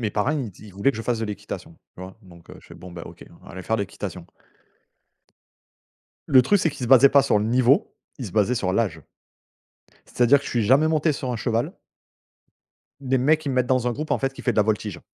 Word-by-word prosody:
mes 110 -3 -2
parents, 105 +6 0
ils 155 - -1
me 125 -6 -4
di 100 +3 -15
ils - - -14
voulaient 100 +8 +2
que - - -9
je 110 - -5
fasse 120 -1 -1
de 115 - -2
l'équitation, 100 -4 -7 0.2
tu 90 - -9
vois. 95 +1 -10
Donc 85 -3 -17
heu, - - -12
je - - -20
fais: - - -12
«Bon, 90 -1 -12
ben 85 - -9
OK. - - -12 0.2
On - - -18
va - - -11
aller 95 +1 -8
faire 110 - -1
l'équitation». 100 -2 -6 2.0
Le 130 -2 +6
truc, 200 +11 +2
c'est 165 -4 +1
qu'ils 135 -3 -6
se - - -5
basaient 135 +1 +7
pas 140 - +6
sur 105 - +2
le 105 - -1
niveau, 125 +4 +2 0.2
ils 125 - -5
se 90 - -10
basaient 110 +3 +2
sur 95 -6 -1
l'âge. 95 -7 -1 1.0
C'est-à-dire 125 +3 +3
que 140 - -13
je - - -6
suis 120 -3 0
jamais 135 +8 +4
monté 155 0 +1
sur 130 -2 -5
un - - -3
cheval. 115 0 -2 1.3
Les 130 -1 0
mecs, 155 +5 +2
ils 140 - -3
me 130 - -3
mettent 125 - +2
dans 125 -1 +1
un 120 - -1
groupe, 155 +5 -6
en - - +1
fait, 135 0 -2
qui - - -11
fait 125 - +1
de - - -10
la 105 - +5
voltige. 105 -2 -3
120 Hz, 260 wpm, -23 LUFS, 105-135 Hz, 2.0 s, basaient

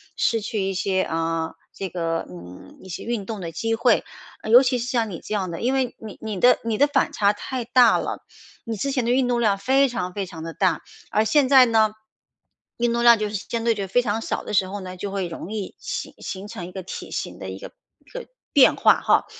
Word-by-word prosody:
失 230 -1 +1
去 210 -1 -3
一 195 0 -1
些， 190 0 0
啊， 165 -1 -2 0.2
这 190 -2 -5
个， 165 -2 -2
嗯， 90 +1 -12
一 190 - -13
些 180 - -6
运 230 -4 -3
动 215 -3 -5
的 165 -1 -5
机 225 +8 -1
会。 235 0 +3 0.4
呃， 220 - -6
尤 245 +4 +8
其 250 -1 +1
是 240 +1 -4
像 230 -4 0
你 170 - -6
这 215 - -6
样 185 -3 -2
的， 165 - -5
因 255 +3 0
为 260 -2 0
你 215 -3 -9
你 215 -4 -4
的 250 - +6
你 225 -2 -1
的 285 +2 +5
反 285 -1 +1
差 205 -1 +2
太 250 +2 -5
大 245 -1 +5
了， - - -4 0.4
你 225 -2 -4
之 275 +6 -1
前 255 -4 0
的 235 - 0
运 255 0 +2
动 240 -1 +1
量 205 -3 +2
非 265 +6 +3
常 185 -6 -4
非 200 -2 -3
常 175 -3 -10
地 165 0 -6
大， 180 -5 +1 0.3
而 215 - +2
现 280 +2 +3
在 260 -2 +8
呢， 220 -2 +3 0.9
运 240 0 +1
动 235 - 0
量 235 -2 +7
就 210 - -1
是 210 - -5
相 230 +4 -4
对 230 - +3
就 200 -2 -3
非 245 +6 +2
常 220 -1 -2
少 - - -3
的 - - -5
时 190 -2 +3
候 205 +1 -5
呢， 185 -1 -7
就 195 +2 -5
会 195 -3 -2
容 170 +4 -8
易 210 -3 -5
形 - - -5
形 195 +2 -6
成 205 -6 -7
一 180 - -9
个 190 - -6
体 185 - -8
型 - - -4
的 - - -6
一 - - -7
个 - - -10 0.3
一 - - -22
个 - - -7 0.3
变 275 -3 +6
化 - - +4
哈， - - +3
215 Hz, 270 characters per minute, -23 LUFS, 185-240 Hz, 0.9 s, 尤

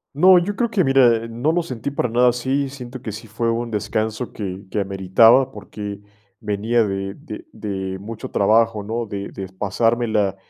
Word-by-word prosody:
No, 185 +5 +7
yo 200 +3 -3
creo 235 - +1
que, 205 -5 +2
mira, 125 -5 +4
no 120 +8 0
lo 175 0 +1
sentí 130 -4 -4
para 135 -3 -1
nada 120 +2 +3
así, 130 +3 -1
siento 130 -2 -9
que 110 -4 -5
sí 110 +2 -9
fue 115 +2 -1
un 115 0 -2
descanso 110 +2 -2
que 95 -1 -6
que 105 - -1
ameritaba 105 +7 +4
porque 105 -5 -7 0.4
venía 110 +2 +1
de 95 -1 -3
de 165 - -9
de 95 -2 -4
mucho 105 +3 -7
trabajo, 110 +1 +2
¿no?, 115 +3 -3
de 100 -1 -5
de 95 - -6
pasármela 105 +1 0
115 Hz, 175 wpm, -21 LUFS, 100-125 Hz, 0.4 s, No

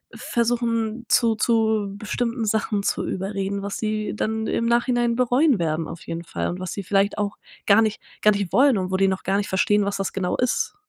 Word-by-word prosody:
versuchen, 235 -1 -1
zu 230 -2 +3
zu 220 -3 +1
bestimmten 230 +2 -2
Sachen 210 -1 0
zu - - 0
überreden, 195 +1 -3
was 200 0 -4
sie 215 -1 -2
dann 220 +1 -2
im 230 - 0
Nachhinein 240 0 +2
bereuen 255 +3 +3
werden 160 -1 -1
auf 165 0 -8
jeden 165 0 -5
Fall - - -3
und 180 - -5
was 185 -1 -4
sie 200 - -5
vielleicht 195 +2 +1
auch 205 -1 -2 0.3
gar 205 +2 +6
nicht 220 -1 0 0.2
gar 210 - +6
nicht 200 -4 -2
wollen 260 +1 +5
und 185 -1 -2
wo 190 - +1
die 195 0 +3
noch 190 0 -2
gar 195 +1 +1
nicht 205 - -2
verstehen, 205 +2 +2
was 200 0 -2
das 195 - -3
genau 185 -2 -1
ist. 250 +10 0
210 Hz, 210 wpm, -23 LUFS, 195-230 Hz, 0.3 s, gar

